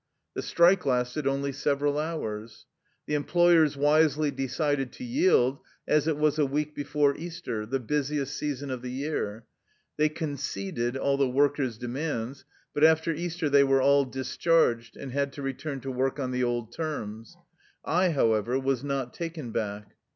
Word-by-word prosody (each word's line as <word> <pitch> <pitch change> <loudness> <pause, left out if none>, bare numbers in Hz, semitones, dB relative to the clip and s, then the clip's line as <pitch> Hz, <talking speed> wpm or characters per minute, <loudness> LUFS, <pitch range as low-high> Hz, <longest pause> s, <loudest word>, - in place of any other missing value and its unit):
The - - -3
strike 180 +3 +4
lasted 125 +3 0
only 140 +1 0
several 145 +2 0
hours. 115 -9 -5 0.4
The - - -4
employers 160 0 +4
wisely 150 +1 +3
decided 135 0 -1
to - - -9
yield, 240 - +3 0.3
as 150 0 +2
it 155 -2 +1
was 150 0 +2
a 150 - +4
week 150 +2 -2
before 145 -1 +1
Easter, 160 -10 -5
the 135 +3 -1
busiest 145 +2 -1
season 145 -2 -3
of 130 -2 -4
the 125 - -5
year. 125 -5 -3 0.5
They 155 0 +3
conceded 135 - -3
all 140 +1 +1
the 135 -2 +2
workers' 135 -3 +1
demands. 130 +1 -4 0.3
But 145 - 0
after 160 +1 +5
Easter 170 0 -2
they 140 -1 +5
were 135 -1 +3
all 140 +1 +4
discharged, 130 -2 +1
and 135 - -7
had 140 +1 -1
to 140 - -7
return 135 +1 -4
to 135 - -4
work 130 +2 -1
on 130 -2 -2
the 125 0 0
old 120 -1 -2
terms. 115 -9 -5 0.5
I, 180 +3 +2
however, 115 -4 +2
was 135 -1 -1
not 135 -3 -2
taken 165 -7 -5
back. 105 -2 -4
140 Hz, 160 wpm, -27 LUFS, 125-150 Hz, 0.5 s, after